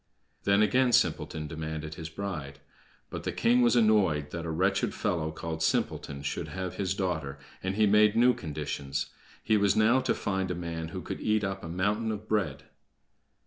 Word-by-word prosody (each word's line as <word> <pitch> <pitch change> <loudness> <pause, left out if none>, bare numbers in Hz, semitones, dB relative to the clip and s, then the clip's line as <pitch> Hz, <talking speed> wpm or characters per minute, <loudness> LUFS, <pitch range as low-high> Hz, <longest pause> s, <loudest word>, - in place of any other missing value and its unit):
Then 100 +1 +4
again 125 +4 +3
Simpleton 80 -7 +1
demanded 80 0 -5
his 80 0 -7
bride. 80 -6 -5 0.5
But - - -4
the - - -1
king 120 +2 +3
was 120 0 +4
annoyed 95 -11 +3
that 85 -1 -4
a - - -3
wretched 95 +5 +1
fellow 85 -7 -1
called 80 0 -5
"Simpleton" 70 -3 -1
should - - -3
have 95 -1 -5
his 95 -1 -1
daughter, 80 -8 -2 0.2
and 95 +1 -2
he 110 +1 +4
made 105 0 +5
new 125 +2 +5
conditions. 75 - -4 0.3
He 110 - +3
was 100 0 +3
now 110 +4 +4
to - - 0
find 95 -2 -1
a 90 - -1
man 85 -1 -4
who 80 - -6
could - - -5
eat 110 0 +1
up 95 -1 -3
a 80 - -6
mountain 105 +6 0
of 105 0 -6
bread. 80 -10 -1
95 Hz, 185 wpm, -29 LUFS, 80-105 Hz, 0.5 s, made